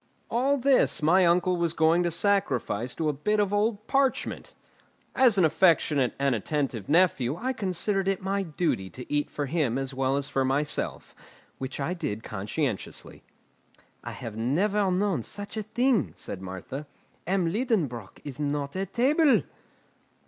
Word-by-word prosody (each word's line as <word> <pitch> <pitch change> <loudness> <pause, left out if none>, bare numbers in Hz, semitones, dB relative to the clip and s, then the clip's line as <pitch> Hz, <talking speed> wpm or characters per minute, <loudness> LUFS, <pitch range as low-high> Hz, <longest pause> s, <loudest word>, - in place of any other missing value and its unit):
All 265 +5 +2
this 265 - +2
my 180 +3 +5
uncle 180 +1 +2
was 170 -1 0
going 165 +1 +3
to 175 - +1
sacrifice 140 - 0
to 160 - -1
a 150 - +1
bit 210 +10 0
of 205 -1 +1
old 210 +1 0
parchment. 270 0 -1 0.6
As 250 -5 +4
an 185 - +5
affectionate 155 -6 +3
and 140 -1 +1
attentive 120 -2 -2
nephew 150 -6 +3
I 255 +9 -2
considered 195 -2 -1
it 195 -1 +1
my 195 +1 -1
duty 160 - -2
to 125 +6 -8
eat 145 0 0
for 145 - -3
him 140 -4 0
as 135 0 -3
well 135 +1 0
as 140 -1 0
for 135 -2 0
myself, 145 +3 -1 0.5
which 135 +2 -5
I 145 +6 -1
did 110 - -4
conscientiously. 105 +3 -4 0.8
"I - - -6
have 110 -2 -7
never 190 - +1
known 185 - +1
such 205 - -7
a 220 - -2
thing," 240 +1 +1
said 95 - -5
Martha. 95 +10 -7 0.4
"M. 180 -3 +1
Liedenbrock 170 - -2
is 145 -1 -7
not 145 0 -2
at 195 0 -4
table!" 285 +4 +4
165 Hz, 155 wpm, -27 LUFS, 135-200 Hz, 0.8 s, my